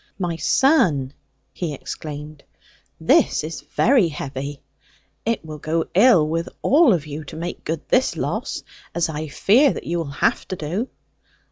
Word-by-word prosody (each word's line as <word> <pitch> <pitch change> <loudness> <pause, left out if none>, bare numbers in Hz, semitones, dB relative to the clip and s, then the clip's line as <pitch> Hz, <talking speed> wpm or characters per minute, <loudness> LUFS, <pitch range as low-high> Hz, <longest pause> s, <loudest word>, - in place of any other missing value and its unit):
'My 175 -3 -2
son,' 165 - +3 0.4
he 160 -5 -3
exclaimed, 150 +1 -8 0.6
'this - - +3
is 155 0 -5
very 235 -5 +3
heavy. 140 -2 -5 0.7
It 230 -7 0
will 155 -1 -8
go 160 +3 -1
ill 195 -6 +6
with 165 +2 -2
all 290 -1 +5
of 165 -6 +1
you 150 +1 -6
to - - -9
make 170 +2 -5
good 160 -1 -4
this 255 - +2
loss, - - -3 0.3
as 170 -1 +1
I 155 0 -4
fear 235 - +4
that - - -6
you 170 +1 -2
will 165 - -2 0.2
have - - +1
to 185 - -3
do.' 180 - -3
165 Hz, 155 wpm, -22 LUFS, 150-195 Hz, 0.7 s, ill